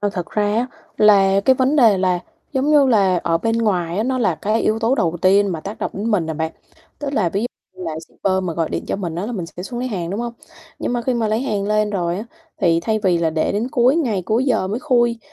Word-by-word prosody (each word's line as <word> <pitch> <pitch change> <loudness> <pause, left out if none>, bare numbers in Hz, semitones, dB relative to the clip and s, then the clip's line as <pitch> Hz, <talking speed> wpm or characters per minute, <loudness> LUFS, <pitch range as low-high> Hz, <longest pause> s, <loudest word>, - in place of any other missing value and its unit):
Ơ, 205 - 0
thật 180 -4 -5
ra 210 - 0
á, 240 +2 +1 0.3
là 195 -2 +5
cái 260 - +5
vấn 265 +3 +1
đề 225 -8 +5
là, 185 -1 +1 0.3
giống 275 +2 +1
như 290 -2 +5
là, 195 -7 +3
ở 165 -1 +1
bên 225 +5 0
ngoài 180 -6 0
á, 215 - +1
nó 260 +1 0
là 235 - +2
cái 215 +2 -1
yếu 215 +1 +1
tố 230 +3 +2
đầu 175 -9 0
tiên 200 +2 +5
mà 160 - -4
tác 200 +6 -7
động - - -2
đến 210 +4 -2
mình 175 -7 +1
à - - -3
bạn. 160 +1 -3 0.5
Tức 285 -2 -4
là 210 -10 +1
ví 195 +4 -2
dụ 240 - 0 0.3
như 185 - -6
là 165 -2 -3
shipper 195 - -2
mà 180 -2 -2
gọi 165 -1 -1
điện - - -4
cho - - -2
mình 175 -5 -4
á, 180 +5 -3
là 245 - -4
mình 185 -7 -4
sẽ 175 +2 -9
xuống 240 +5 -6
lấy 255 - -2
hàng, 175 -7 -3
đúng 200 +4 -3
hông? 240 0 -4 0.5
Nhưng - - -2
mà 240 -1 -1
khi 255 +2 0
mà 230 -2 0
lấy 215 +2 0
hàng 205 -7 -2
lên 215 0 +1
rồi 175 -3 -1
á, 210 - -5 0.4
thì 170 -4 +3
thay 220 +4 0
vì 180 -4 +3
là 165 -1 +1
để 155 0 0
đến 215 +5 -1
cuối 255 +4 +3
ngày, 230 - 0
cuối 220 +8 +1
giờ 225 -8 +1
mới 215 +5 -3
khui 240 -5 +2
210 Hz, 280 wpm, -20 LUFS, 180-240 Hz, 0.5 s, là